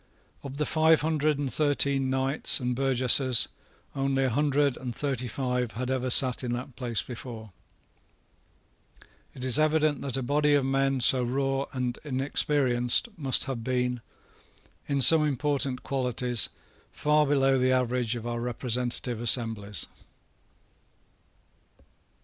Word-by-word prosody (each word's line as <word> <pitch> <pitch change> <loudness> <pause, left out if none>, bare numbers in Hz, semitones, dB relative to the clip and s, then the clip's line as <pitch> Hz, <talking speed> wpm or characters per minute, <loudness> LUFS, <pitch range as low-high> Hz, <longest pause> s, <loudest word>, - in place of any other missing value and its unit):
Of 140 0 -9
the 150 - -1
five 160 +1 +3
hundred 155 -1 0
and 140 -2 -3
thirteen 140 -2 +1
knights 135 +4 +2
and 125 -1 -2
burgesses 130 -1 +3 0.5
only 135 -1 0
a 130 - 0
hundred 145 +1 +1
and 125 -2 -7
thirty 135 -3 -3
five 125 -1 -3
had 125 +3 -4
ever 130 -1 -2
sate 130 0 +4
in 120 -1 -3
that 125 +1 -7
place 120 -3 -3
before. 115 -3 -9 1.8
It 130 - -5
is 130 +3 +5
evident 155 -1 +1
that 135 -1 -3
a 135 - -3
body 145 +3 +1
of 140 -2 +1
men 135 0 0
so 130 +1 +4
raw 135 +2 -1
and 125 -2 -4
inexperienced 135 - 0
must 135 -5 +2
have 130 -4 -5
been, 125 -1 -2 0.9
in 140 -1 -1
some 155 +5 +8
important 140 -2 -2
qualities, 125 -3 -1 0.4
far 150 0 +1
below 135 -2 +2
the 130 0 +1
average 125 -2 -1
of 115 -1 -7
our 120 0 -4
representative 120 0 -3
assemblies. 110 - +1
130 Hz, 130 wpm, -26 LUFS, 125-140 Hz, 1.8 s, some